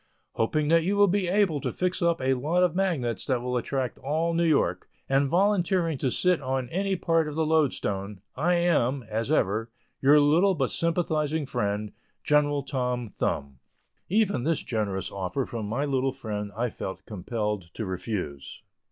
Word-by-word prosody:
Hoping 150 Hz, +6 st, 0 dB
that 165 Hz, 0 st, +4 dB
you 200 Hz, +4 st, 0 dB
will 205 Hz, -, +7 dB
be 195 Hz, 0 st, +1 dB
able 180 Hz, -6 st, +2 dB
to -, -, -2 dB
fix 180 Hz, 0 st, -1 dB
up 170 Hz, -1 st, +2 dB
a 130 Hz, 0 st, +2 dB
lot 155 Hz, +8 st, +1 dB
of 180 Hz, -3 st, +2 dB
magnets 140 Hz, -, 0 dB
that 130 Hz, -2 st, +1 dB
will 125 Hz, +1 st, -3 dB
attract 125 Hz, 0 st, -2 dB
all 160 Hz, +4 st, 0 dB
New 170 Hz, +1 st, +2 dB
York, 155 Hz, -3 st, +1 dB, 0.2 s
and 135 Hz, +1 st, +2 dB
volunteering 180 Hz, -3 st, +2 dB
to 130 Hz, -, +1 dB
sit 180 Hz, +5 st, +2 dB
on 130 Hz, -1 st, -2 dB
any 195 Hz, +4 st, 0 dB
part 165 Hz, -2 st, +1 dB
of 150 Hz, -, -5 dB
the 160 Hz, 0 st, +1 dB
loadstone, 105 Hz, -11 st, 0 dB, 0.2 s
I 175 Hz, +6 st, +2 dB
am, 140 Hz, -7 st, +1 dB
as 110 Hz, +5 st, -2 dB
ever, 110 Hz, -5 st, +1 dB, 0.3 s
your 145 Hz, +2 st, +6 dB
little 170 Hz, +7 st, +4 dB
but 135 Hz, -5 st, 0 dB
sympathizing 160 Hz, -3 st, 0 dB
friend, 105 Hz, -4 st, -2 dB, 0.3 s
GEN. 145 Hz, -1 st, +2 dB
TOM 125 Hz, -4 st, -2 dB
THUMB. 70 Hz, -8 st, -3 dB, 0.5 s
Even 200 Hz, -, +2 dB
this 160 Hz, +2 st, 0 dB
generous 100 Hz, -5 st, -2 dB
offer 100 Hz, +7 st, -2 dB
from 110 Hz, -3 st, -5 dB
my 125 Hz, +7 st, -1 dB
little 135 Hz, -1 st, 0 dB
friend 105 Hz, -6 st, -5 dB
I 120 Hz, 0 st, 0 dB
felt 95 Hz, -, -6 dB
compelled 105 Hz, -2 st, -3 dB
to 110 Hz, -, -3 dB
refuse. 90 Hz, -7 st, -5 dB
140 Hz, 170 wpm, -27 LUFS, 115-165 Hz, 0.5 s, will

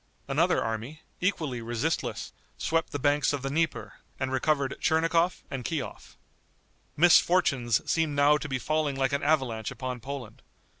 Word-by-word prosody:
Another -, -, +2 dB
army, 115 Hz, +8 st, -5 dB, 0.2 s
equally 155 Hz, -10 st, -1 dB
resistless, 120 Hz, +8 st, -2 dB, 0.2 s
swept 165 Hz, 0 st, 0 dB
the -, -, -2 dB
banks 145 Hz, +1 st, +2 dB
of 140 Hz, -2 st, -3 dB
the 135 Hz, -, -2 dB
Dnieper, 160 Hz, +2 st, -2 dB, 0.2 s
and 130 Hz, -1 st, -2 dB
recovered 140 Hz, +1 st, +1 dB
Tchernigov 165 Hz, +2 st, +2 dB
and 135 Hz, -2 st, -4 dB
Kiof. 150 Hz, -1 st, -5 dB, 0.8 s
Misfortunes 145 Hz, -8 st, +4 dB
seemed 160 Hz, -3 st, +1 dB
now 145 Hz, +1 st, +5 dB
to 150 Hz, -, -6 dB
be 130 Hz, -, 0 dB
falling 150 Hz, +2 st, -1 dB
like 135 Hz, 0 st, 0 dB
an 140 Hz, -, 0 dB
avalanche 130 Hz, -8 st, 0 dB
upon 130 Hz, -2 st, -5 dB
Poland. 130 Hz, -2 st, -7 dB
140 Hz, 145 wpm, -28 LUFS, 130-160 Hz, 0.8 s, now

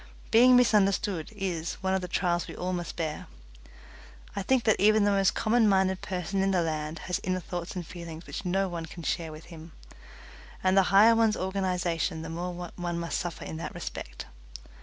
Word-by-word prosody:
Being 250 Hz, +3 st, +7 dB
misunderstood 200 Hz, -7 st, +2 dB
is 175 Hz, -5 st, -3 dB
one 190 Hz, 0 st, +1 dB
of 190 Hz, -, +1 dB
the 180 Hz, -, -4 dB
trials 175 Hz, -1 st, 0 dB
we -, -, -8 dB
all 185 Hz, +1 st, -3 dB
must 175 Hz, -1 st, -4 dB
bear. 160 Hz, -3 st, -4 dB, 1.1 s
I 200 Hz, -, -1 dB
think 250 Hz, +5 st, +2 dB
that 220 Hz, -, +3 dB
even 215 Hz, +1 st, +5 dB
the 205 Hz, -, +3 dB
most 195 Hz, -3 st, +2 dB
common 225 Hz, 0 st, +3 dB
minded 190 Hz, -1 st, +2 dB
person 190 Hz, +1 st, -2 dB
in 195 Hz, -, +2 dB
the 185 Hz, -3 st, +2 dB
land 155 Hz, 0 st, -3 dB
has 180 Hz, -, -1 dB
inner 185 Hz, 0 st, -1 dB
thoughts 175 Hz, +1 st, -6 dB
and 180 Hz, -2 st, -4 dB
feelings 170 Hz, -1 st, -9 dB
which -, -, -6 dB
no 190 Hz, +1 st, +1 dB
one 170 Hz, -2 st, -5 dB
can 170 Hz, -, -10 dB
share 160 Hz, 0 st, -2 dB
with 155 Hz, +1 st, -11 dB
him, 160 Hz, 0 st, -11 dB, 0.9 s
and 185 Hz, 0 st, +3 dB
the 195 Hz, -, +7 dB
higher 210 Hz, +5 st, +7 dB
one's 225 Hz, -1 st, +3 dB
organization 180 Hz, -3 st, -1 dB
the 160 Hz, -, -6 dB
more 175 Hz, +1 st, -5 dB
one 175 Hz, -1 st, -3 dB
must 170 Hz, -1 st, -2 dB
suffer 175 Hz, -2 st, -5 dB
in 160 Hz, -, -6 dB
that 160 Hz, -2 st, -6 dB
respect. -, -, -7 dB
180 Hz, 195 wpm, -28 LUFS, 170-195 Hz, 1.1 s, Being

